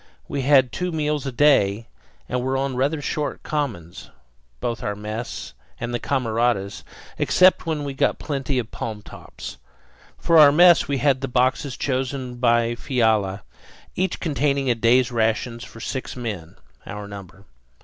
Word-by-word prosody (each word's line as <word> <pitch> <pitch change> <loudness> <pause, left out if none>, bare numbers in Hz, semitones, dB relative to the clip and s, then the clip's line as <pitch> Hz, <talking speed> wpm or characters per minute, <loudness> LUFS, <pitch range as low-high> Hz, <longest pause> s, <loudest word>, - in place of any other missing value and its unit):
We 140 - -3
had 130 -2 +4
two 180 0 -3
meals 150 -3 -1
a - - -2
day, 120 -6 +3 0.4
and 125 0 -1
were 130 +1 -1
on 135 -1 -1
rather 145 +4 0
short 150 0 -3
commons 110 - -4 0.5
both 120 - -3
our 105 - -2
mess 105 +3 -6 0.3
and 120 +1 -4
the 120 - -1
camaradas' 115 -6 -1 0.4
except 185 -1 +4
when 155 -2 -1
we 140 -1 -4
got 135 - +1
plenty 135 -2 -3
of 115 -3 -3
palm 110 -2 -5
tops. - - -10 0.6
For 165 -1 +4
our 145 -2 +9
mess 175 +3 +6
we 140 -2 0
had 135 0 +2
the 135 - -2
boxes 130 +2 0
chosen 130 -1 -2
by 120 -1 +2
Fiala, 110 -6 0 0.5
each 185 -1 -1
containing 140 -3 0
a - - +4
day's 120 +2 +3
rations 115 +1 -1
for 115 - -12
six 130 +3 -5
men, 105 -10 -6 0.3
our 105 0 -6
number. 100 -1 -11
125 Hz, 155 wpm, -23 LUFS, 115-140 Hz, 0.6 s, our